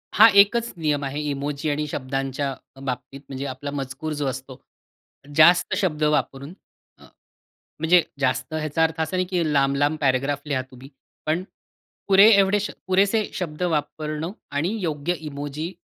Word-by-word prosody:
हा 220 +2 +9
एकच 235 +3 0
नियम 150 -3 0
आहे, 140 +2 -4
इमोजी 145 +2 -3
आणि 150 +1 -1
शब्दांच्या 135 0 -3 0.3
बाबतीत 135 +1 -5
म्हणजे 135 +1 -5
आपला 135 +2 -5
मजकूर 140 +2 -4
जो - - 0
असतो. 130 0 -6 0.8
जास्त 175 +4 +6
शब्द 165 -7 0
वापरून 150 0 0 0.4
अ, - - -19 0.8
म्हणजे 170 +3 +5 0.2
जास्त 130 +1 -1
ह्याचा 155 +1 0
अर्थ 160 0 0
असा 160 +3 -2
नाही, 185 - +1
की 180 -2 0
लांब-लांब 140 +2 +2
पॅराग्राफ 135 +1 +1
लिहा 135 -3 0
तुम्ही. 130 +2 -13 0.4
पण 160 +4 0 0.6
पुरे 195 +2 +7
एवढे 200 0 +4
श 205 - -3 0.2
पुरेसे 200 +3 +3
शब्द 165 -2 -5
वापरणं 155 0 -2 0.2
आणि 145 +6 0
योग्य 160 -1 -1 0.2
इमोजी 145 +4 -5
150 Hz, 145 wpm, -23 LUFS, 140-170 Hz, 0.8 s, हा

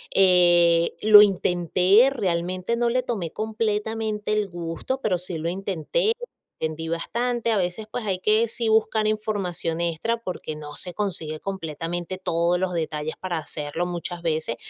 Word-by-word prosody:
eh, 175 -3 +5
lo 210 -1 +10
intenté, 185 +3 +4
realmente 185 -2 -1
no 235 0 +1
le 255 +1 +1
tomé 195 -10 -3
completamente 215 -1 -2
el 210 -2 0
gusto, 170 +9 -4
pero 190 -8 0
sí 180 -1 -5
lo 160 +1 -3
intenté, 195 - -1 0.5
entendí 160 +1 -3
bastante, 235 +8 -1
a 220 - +2
veces, 185 +3 -2
pues 245 - -3
hay 190 -2 0
que, 215 +4 +2
sí 230 0 -3
buscar 220 0 +2
información 200 -6 -1
extra 170 +8 -1
porque 180 -7 -6
no 150 -1 -9
se 180 +4 -6
consigue 165 -7 -3
completamente 175 0 -4
todos 170 -1 +1
los 185 -1 -1
detalles 155 -2 -2
para 185 -2 -3
hacerlo 150 +2 -4
muchas 175 0 -5
veces, 155 -7 -1
185 Hz, 150 wpm, -24 LUFS, 170-215 Hz, 0.5 s, lo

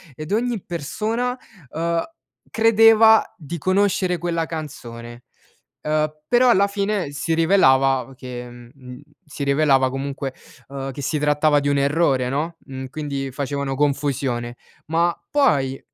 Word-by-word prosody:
ed 155 +5 -8
ogni 230 -1 -1
persona, 225 - -3 0.3
uhm, 170 +1 -1 0.5
credeva 225 0 +5
di 170 -1 -7
conoscere 185 +1 +1
quella 170 -1 -2
canzone, 120 -7 -8 0.6
uhm, 155 0 0
però 245 +7 +4
alla 200 -3 +4
fine 200 -5 -2
si 150 +3 -3
rivelava 135 -7 +3
che, 125 -1 -8
mhmm, 125 +1 -13 0.2
si 150 -2 -6
rivelava 140 -2 +3
comunque, 135 0 -4 0.3
uhm, 135 0 -6
che 135 - -8
si 150 +2 -1
trattava 150 0 +3
di 145 - -1
un 140 0 +2
errore 140 -3 +1
no, 155 +6 -2
mhmm, 130 -1 -8
quindi 140 -1 -4
facevano 140 0 -3
confusione. 135 -4 -1 0.3
Ma 170 +2 +1
poi, 140 - +2
150 Hz, 130 wpm, -21 LUFS, 135-175 Hz, 0.6 s, credeva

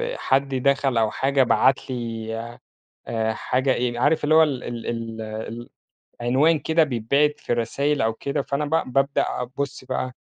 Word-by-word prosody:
حد 135 - 0
دخَل 135 -1 +1
أو 110 -1 +2
حاجة 135 0 +2
بعَت 130 +2 +2
لي، 115 -3 -4 0.7
آآ، 110 -1 -1
حاجة 130 +4 0
إيه، 120 -1 -1
عارِف 145 +5 +2
اللي 155 +1 +3
هو 160 - +8
ال 140 -5 -1
ال 120 -1 -6
ال 115 -1 -4
ال 110 +2 -6 0.5
العنوان 135 +7 +3
كده 160 +2 +2
بيتبعَت 140 +3 +1
في - - -3
رسايل 140 +5 0
أو 110 0 +2
كده، 140 +4 -2
فأنا 140 +2 -2
ب 150 -4 -1
بابدأ 135 +2 +2 0.2
أبُصّ 130 +2 -5
بقى، 130 0 -3
130 Hz, 165 wpm, -23 LUFS, 115-140 Hz, 0.7 s, هو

